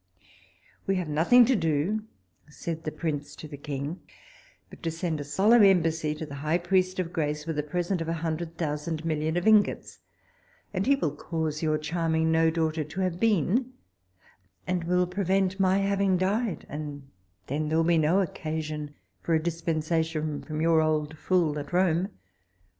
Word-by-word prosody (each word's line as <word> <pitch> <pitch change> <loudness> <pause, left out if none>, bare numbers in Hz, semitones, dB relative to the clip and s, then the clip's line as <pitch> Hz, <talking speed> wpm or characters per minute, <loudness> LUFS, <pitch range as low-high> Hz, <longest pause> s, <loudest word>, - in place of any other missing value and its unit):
"We 195 - +2
have 180 -4 -2
nothing 175 +12 +6
to 260 +2 +3
do, 170 +5 0 0.4
said 165 +1 -6
the 155 - -2
prince 145 -3 -4
to 155 - -9
the 145 - -8
king, 145 +3 -5 0.7
but - - -15
to 165 - -1
send 165 -2 -3
a - - -3
solemn 205 +11 +4
embassy 165 -5 +3
to 160 - -5
the 145 - -10
high 155 +3 +1
priest 185 +1 +1
of 180 -2 -3
grace, 150 -2 -2
with 160 -2 -2
a - - +3
present 175 +4 -2
of 165 - -3
a - - 0
hundred 165 +1 -3
thousand 155 0 -3
million 160 +1 0
of 175 - -1
ingots, 215 -2 +3 0.7
and 195 +3 -1
he 280 - +5
will 155 - -2
cause 160 -1 -3
your 155 -1 +1
charming 160 +1 0
no 160 0 +4
daughter 160 -1 0
to 155 +6 -5
have 180 -2 -1
been, 225 - +2 0.9
and 180 -2 -1
will 180 +1 +2
prevent 190 +1 0
my 190 0 +3
having 195 -1 +2
died, 200 +3 -1
and 145 -2 -7 0.4
then 150 +3 -2
there 160 - +1
will 165 - +4
be 170 -1 +4
no 165 +6 +3
occasion 155 -4 -4 0.3
for 165 - +1
a 160 - 0
dispensation 160 -2 -1
from 155 0 -4
your 165 -1 +4
old 155 -1 0
fool 160 -3 +1
at 145 - -8
Rome." 180 +1 +2
165 Hz, 175 wpm, -27 LUFS, 155-185 Hz, 0.9 s, nothing